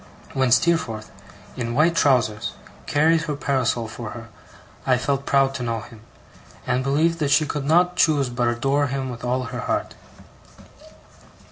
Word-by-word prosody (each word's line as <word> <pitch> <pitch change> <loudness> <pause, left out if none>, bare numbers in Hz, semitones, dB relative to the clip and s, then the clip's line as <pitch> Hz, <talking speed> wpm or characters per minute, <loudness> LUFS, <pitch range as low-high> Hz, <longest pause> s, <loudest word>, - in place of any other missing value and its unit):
When 130 -1 +1
Steerforth, 120 -8 +1 0.4
in 120 -1 -3
white 165 +4 +3
trousers, 120 -8 +2 0.3
carried 160 +3 +3
her 150 - -2
parasol 130 -5 0
for 110 0 -7
her, 115 0 -10 0.5
I 130 -1 +3
felt 140 +2 -2
proud 135 -1 +3
to 130 - -5
know 115 -2 -2
him; 110 0 -13 0.6
and 125 +1 0
believed 160 +5 +1
that 145 -2 0
she 155 +2 +4
could 145 -1 -4
not 175 +4 +3
choose 145 -5 +3
but 120 0 0
adore 135 +5 +1
him 135 -1 -3
with 120 -1 -9
all 125 +1 0
her 115 - -6
heart. - - -2
135 Hz, 155 wpm, -23 LUFS, 120-145 Hz, 0.6 s, she